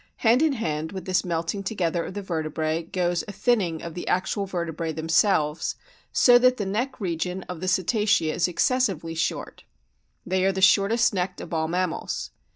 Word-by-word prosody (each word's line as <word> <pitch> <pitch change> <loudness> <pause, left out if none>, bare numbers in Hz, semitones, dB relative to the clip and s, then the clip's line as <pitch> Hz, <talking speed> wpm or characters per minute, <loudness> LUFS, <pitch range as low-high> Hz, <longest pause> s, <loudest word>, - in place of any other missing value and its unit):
Hand 235 +4 +5
in 315 -2 +3
hand 160 - -3
with 190 -1 -7
this 185 -1 +1
melting 170 +2 -2
together 180 -4 -1
of 185 - -8
the 205 - -4
vertebrae 160 -2 -2
goes 175 +1 -1
a - - -5
thinning 195 -8 0
of 170 - -6
the 175 - -6
actual 195 +2 0
vertebrae 170 -3 -3
themselves, 160 0 +1 0.4
so 245 -1 +6
that 255 0 +4
the 205 - -2
neck 240 +8 -2
region 180 -1 -3
of 180 -2 -7
the 185 - -4
Cetacea 185 -3 +2
is 175 - +1
excessively 180 - 0
short. 165 +1 -3 0.6
They 185 +1 0
are 195 - +3
the 190 - -4
shortest 200 +5 +4
necked 180 -1 -2
of - - -8
all 160 -1 0
mammals. 180 0 -2
180 Hz, 175 wpm, -25 LUFS, 165-200 Hz, 0.6 s, so